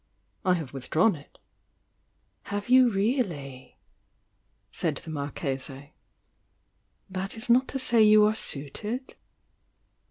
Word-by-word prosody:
"I 185 -2 +3
have 155 -7 -6
withdrawn 155 - +2
it.". 145 - -16 1.1
"Have 205 +3 -4
you 255 -1 +6
really?" 195 - -2 0.9
said - - -1
the 160 - -8
Marchese. 140 -1 -5 1.1
"That 190 +2 -5
is 230 +2 0
not 255 +2 +4
to - - -3
say 240 -3 +3
you 215 0 +7
are 215 - +3
suited?" 215 - -5
195 Hz, 105 wpm, -27 LUFS, 145-225 Hz, 1.1 s, you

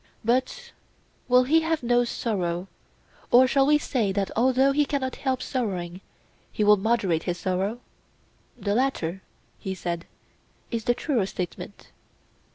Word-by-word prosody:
But 260 - 0 0.6
will 250 0 +5
he 315 +6 +3
have 320 -3 -1
no 240 0 +3
sorrow, 185 -7 -2 0.6
or 250 +2 +7
shall 270 +1 +3
we 300 0 +5
say 240 -8 -1
that 195 0 -1
although 260 +3 +3
he 295 +2 +3
cannot 275 -3 -2
help 260 -2 -1
sorrowing, 185 -8 -3 0.5
he 215 - -1
will 210 0 +7
moderate 200 -5 +1
his 175 - -1
sorrow? 190 +6 -2 0.8
The 205 - -1
latter, 200 -8 -1 0.4
he 190 0 -4
said, 170 -1 -4 0.6
is 230 -2 -3
the 240 - +2
truer 240 - 0
statement. 185 +2 -7
235 Hz, 140 wpm, -25 LUFS, 190-260 Hz, 0.8 s, or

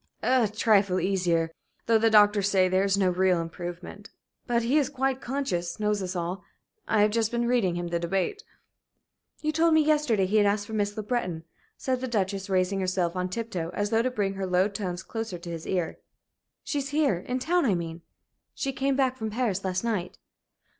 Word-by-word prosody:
"A 250 -3 +3
trifle 205 -3 +2
easier, 175 -3 +1 0.3
though 225 -1 +4
the 225 +1 +4
doctors 205 -2 +5
say 190 -2 +4
there 185 +1 +2
is 200 0 +2
no 190 -2 +3
real 180 -1 +2
improvement. 175 +4 -7 0.4
But 235 -1 +1
he 265 +6 +3
is 280 - 0
quite 270 -2 -1
conscious 205 -10 -2
knows 210 -1 0
us 185 0 -4
all. 175 +2 -3 0.4
I 210 -1 +3
have 210 - +3
just 225 0 +1
been 235 0 -1
reading 230 -8 +2
him 175 0 -3
the 170 0 -1
debate." 195 - -2 1.0
"You 305 - 0
told 325 +1 +3
me 315 - +6
yesterday 295 -10 +2
he 205 +4 +1
had 205 -1 +5
asked 205 0 0
for 220 - -9
Miss 205 0 -1
Le 215 - -3
Breton," 185 -8 -2 0.3
said 255 -1 -1
the 260 - -2
Duchess, 195 -4 -2
raising 190 +1 +1
herself 185 -2 0
on 180 0 -1
tiptoe 185 -6 -4
as 205 0 -1
though 225 0 +3
to 255 - 0
bring 205 -6 -1
her 195 -1 -3
low 185 +1 +3
tones 190 -3 -4
closer 225 -5 -5
to 170 0 -8
his 165 -1 -6
ear. 180 -4 -2 0.6
"She's 280 -2 -2
here 290 - +2
in 250 +7 -3
town, 340 +6 +1
I 200 - +3
mean. 165 -1 -5 0.5
She 270 -1 -2
came 275 +1 0
back 260 -1 +1
from 220 -2 -3
Paris 215 -4 -1
last 185 +1 -1
night." 210 -6 -2
205 Hz, 200 wpm, -27 LUFS, 185-240 Hz, 1.0 s, me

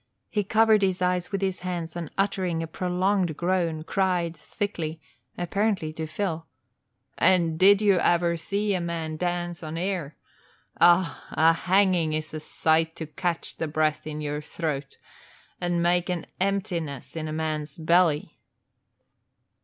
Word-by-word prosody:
He 210 -2 +1
covered 220 +1 +4
his 190 -2 +1
eyes 180 0 0
with 195 -1 -2
his 190 -1 -1
hands 175 -3 -4
and 170 -3 -4
uttering 185 -4 0
a - - -2
prolonged 180 0 0
groan, 170 -3 0
cried 180 -2 0
thickly, 165 -7 -4 0.4
apparently 180 -2 0
to 160 0 -4
Phil, 165 -1 -3 0.7
"And 170 -3 +3
did 200 +2 +6
you 200 -3 +4
ever 170 0 +2
see 200 +5 -1
a 185 - 0
man 165 -2 -3
dance 175 0 -2
on 160 0 -5
air! 175 -5 -3 0.6
Ah, 175 -3 +4
a 165 +1 +4
hanging 180 -2 +2
is 155 0 -3
a 155 - -3
sight 160 +1 +1
to 160 - -5
catch 165 +3 -3
the 160 - -2
breath 155 0 0
in 150 0 -5
your 150 0 -3
throat 150 -3 -4 0.6
and 175 -1 0
make 175 0 +2
an 175 -3 -2
emptiness 180 - -2
in 160 -1 -3
a - - -4
man's 155 -2 -3
belly!" 165 -2 +2
170 Hz, 145 wpm, -26 LUFS, 160-185 Hz, 0.7 s, did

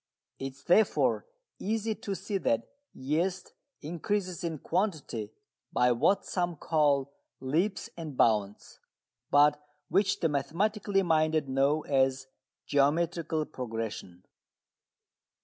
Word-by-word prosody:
It 135 0 -4
is 140 +2 -21
therefore 195 - +3 0.3
easy 220 +1 -1
to 200 -2 -5
see 195 0 -3
that 115 -8 +1 0.3
yeast 175 +7 -2 0.3
increases 180 +3 -2
in 165 -2 -2
quantity 155 - -2 0.4
by 125 0 +3
what 160 +12 +2
some 175 -2 -1
call 145 -3 +1 0.3
"leaps 165 +10 0
and 155 -6 -7
bounds," 105 -3 +1 0.5
but 145 +1 +4 0.3
which 195 +3 +2
the 165 - +3
mathematically 195 +7 0
minded 155 -3 +2
know 135 +3 +2
as 135 -1 +1 0.4
geometrical 160 +2 +1
progression. 110 - -6
155 Hz, 105 wpm, -29 LUFS, 135-180 Hz, 0.5 s, but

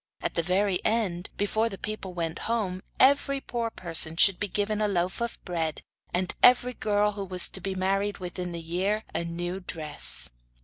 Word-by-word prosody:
At - - -3
the 170 - 0
very 185 +2 0
end, 200 -5 -1
before 215 +3 0
the 195 - -8
people 205 -4 -7
went 165 -2 -4
home, 195 -6 -2 0.2
every 275 +1 +3
poor 235 -3 -4
person 165 -5 +1
should 195 +1 +5
be 205 - -2
given 210 +2 -2
a 210 - +1
loaf 185 +1 -2
of 235 0 -3
bread 165 -4 -3 0.3
and 180 +1 -2
every 250 0 +5
girl 210 -2 0
who 200 -1 -6
was 185 -2 +6
to 190 - -5
be 195 +1 -4
married 195 +2 -1
within 180 -1 -6
the 170 - -6
year 190 +6 -2
a - - -2
new 175 +2 -5
dress. 155 - +5
190 Hz, 185 wpm, -26 LUFS, 175-215 Hz, 0.3 s, was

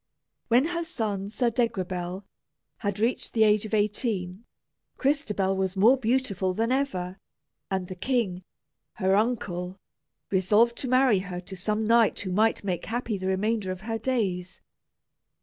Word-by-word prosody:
When 245 +4 +4
her 340 -1 -2
son, 210 - -3
Sir 235 +2 +1
Degrabell, 185 -5 -2 0.5
had 205 -3 -2
reached 230 +4 0
the 220 - +4
age 215 0 +3
of 220 - -1
eighteen, 205 -2 -1 0.5
Crystabell 215 -9 +1
was 190 0 -1
more 225 +7 +6
beautiful 225 -7 0
than 230 +3 0
ever, 190 -9 -1 0.5
and 190 -2 -2
the 185 - -6
king, 195 -3 -1 0.5
her 190 -2 +1
uncle, 190 -5 -1 0.5
resolved 210 +5 +3
to 265 - -3
marry 255 -5 +4
her 180 -1 -5
to 190 +1 -9
some 210 +4 -1
knight 230 0 +4
who 185 - -4
might 215 +4 +2
make 185 -3 -2
happy 230 -3 -2
the 185 - -3
remainder 205 +1 0
of 185 0 -6
her 225 +1 -3
days. 195 -7 -2
210 Hz, 150 wpm, -27 LUFS, 190-235 Hz, 0.5 s, more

